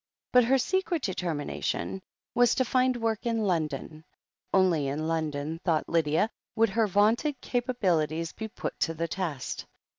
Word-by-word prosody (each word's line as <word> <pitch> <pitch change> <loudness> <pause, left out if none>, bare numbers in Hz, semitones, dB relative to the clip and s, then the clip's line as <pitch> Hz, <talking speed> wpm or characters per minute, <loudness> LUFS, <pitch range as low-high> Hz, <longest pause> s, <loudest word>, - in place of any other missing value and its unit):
But 250 -1 +7
her 265 +3 +4
secret 350 +2 0
determination 180 +1 -2 0.3
was 245 0 +4
to 260 - +2
find 255 0 +2
work 225 -2 -1
in 225 -1 +1
London. 155 -4 -2 0.5
Only 180 -7 +3
in 150 +3 -2
London, 155 -1 -2
thought 160 -4 +1
Lydia, 165 +6 +2 0.2
would 225 -1 +4
her 220 +2 +2
vaunted 225 - +2
capabilities 180 - 0
be 220 - -5
put 215 - -6
to 165 - 0
the 165 +1 -1
test. 165 -7 -4
190 Hz, 145 wpm, -28 LUFS, 160-235 Hz, 0.5 s, But